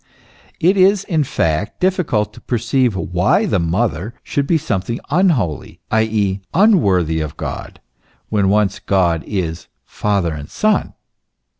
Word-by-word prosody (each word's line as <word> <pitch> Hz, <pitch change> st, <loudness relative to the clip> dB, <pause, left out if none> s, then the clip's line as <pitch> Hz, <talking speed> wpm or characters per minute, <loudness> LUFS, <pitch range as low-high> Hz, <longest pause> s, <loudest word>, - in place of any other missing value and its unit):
It 185 Hz, +4 st, +3 dB
is 195 Hz, +1 st, +4 dB
in 160 Hz, -7 st, 0 dB
fact 80 Hz, -, -1 dB
difficult 155 Hz, -, 0 dB
to -, -, -14 dB
perceive 120 Hz, -1 st, 0 dB
why 95 Hz, -, +1 dB
the -, -, +1 dB
Mother 95 Hz, +4 st, -1 dB
should 140 Hz, -1 st, -2 dB
be 165 Hz, -, +3 dB
something 115 Hz, -4 st, -2 dB
unholy, 145 Hz, -, 0 dB
i. 110 Hz, -, +3 dB
e., 100 Hz, -3 st, -1 dB
unworthy 100 Hz, -, +3 dB
of 75 Hz, -, -5 dB
God, -, -, -6 dB, 0.5 s
when 100 Hz, -3 st, +2 dB
once 100 Hz, -1 st, +1 dB
God 85 Hz, -4 st, +1 dB
is 90 Hz, -5 st, -3 dB, 0.2 s
Father 100 Hz, -6 st, -1 dB
and 75 Hz, -1 st, -8 dB
Son. 215 Hz, 0 st, 0 dB
105 Hz, 135 wpm, -18 LUFS, 90-150 Hz, 0.5 s, is